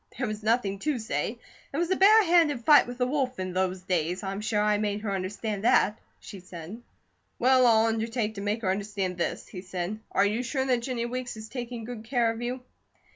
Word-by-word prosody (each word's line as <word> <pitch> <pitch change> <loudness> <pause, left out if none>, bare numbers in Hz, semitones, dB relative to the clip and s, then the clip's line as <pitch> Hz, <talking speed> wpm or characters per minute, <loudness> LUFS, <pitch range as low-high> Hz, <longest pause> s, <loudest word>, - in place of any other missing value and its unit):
There 255 - -1
was 215 -1 -4
nothing 215 -3 +1
to 295 +4 -1
say. 220 - -3 0.3
It 280 - -4
was 345 +2 0
a - - +4
bare 425 +4 +7
handed 325 - +3
fight 295 -4 +7
with 245 0 -7
the 250 - +1
wolf 260 -1 -1
in 185 -1 -4
those 185 0 -1
days. 180 +1 -1
I'm 195 +1 -3
sure 215 0 0
I 210 0 +2
made 210 -1 -1
her 210 -2 -3
understand 200 +2 -3
that," 215 -2 +3 0.2
she 200 - -10
said. 180 +4 -9 0.6
"Well, 255 0 +5
I'll 225 -1 +5
undertake 225 0 -1
to 200 - -7
make 210 +3 -2
her 185 - +2
understand 195 -2 -3
this," - - -2
he 180 - -8
said. 185 +2 -4
"Are 200 - +3
you 215 +4 0
sure 265 +2 -1
that 250 -3 +1
Jennie 235 -1 -2
Weeks 250 -1 -4
is 220 0 -9
taking 240 -2 -6
good 230 -1 -7
care 235 -1 +1
of 225 +1 -7
you?" 250 +1 -4
220 Hz, 220 wpm, -27 LUFS, 200-250 Hz, 0.6 s, bare